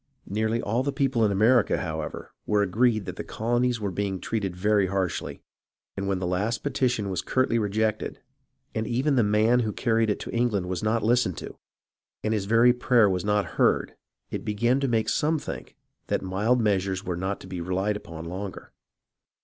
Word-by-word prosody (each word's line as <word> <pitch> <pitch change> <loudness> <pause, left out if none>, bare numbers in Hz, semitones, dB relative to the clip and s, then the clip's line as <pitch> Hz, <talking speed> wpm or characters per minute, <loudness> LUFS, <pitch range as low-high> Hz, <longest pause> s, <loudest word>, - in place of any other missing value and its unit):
Nearly 110 +3 -1
all 115 +4 0
the 140 +2 -1
people 135 -5 +1
in 105 - +3
America, 110 +4 +4
however, 80 -3 -5 0.2
were 105 -1 +3
agreed 110 +2 +2
that 90 - -6
the - - -4
colonies 120 +1 0
were 100 -2 -2
being 95 +1 -2
treated 100 -4 -2
very 100 +1 +2
harshly, 95 -1 -2 0.5
and 100 0 -3
when 100 -1 +1
the 90 - -3
last 100 +6 -1
petition 125 -7 0
was 90 -2 -1
curtly 130 -3 +1
rejected, 110 +1 -1 0.5
and 110 0 -2
even 135 +4 +1
the 125 - +4
man 110 +3 +3
who 110 -3 0
carried 115 +1 +1
it 105 - 0
to - - -6
England 115 -6 0
was 90 -1 -3
not 110 0 +1
listened 115 -5 +2
to, - - -7 0.7
and 110 - 0
his 105 -3 -1
very 115 +4 +5
prayer 120 -3 +4
was 90 -1 -1
not 105 0 +1 0.2
heard, - - +3 0.4
it - - -4
began 120 +5 +1
to 140 - 0
make 115 -3 +1
some 155 +2 +1
think 145 - -7 0.3
that - - -1
mild 105 +7 +1
meas 100 -4 +1
ures 95 +1 -3
were 90 -3 -2
not 95 +3 -3
to - - -12
be 90 -2 -5
relied 95 +4 -1
upon 80 -5 -8
longer. 95 +3 -7
105 Hz, 190 wpm, -26 LUFS, 95-120 Hz, 0.7 s, very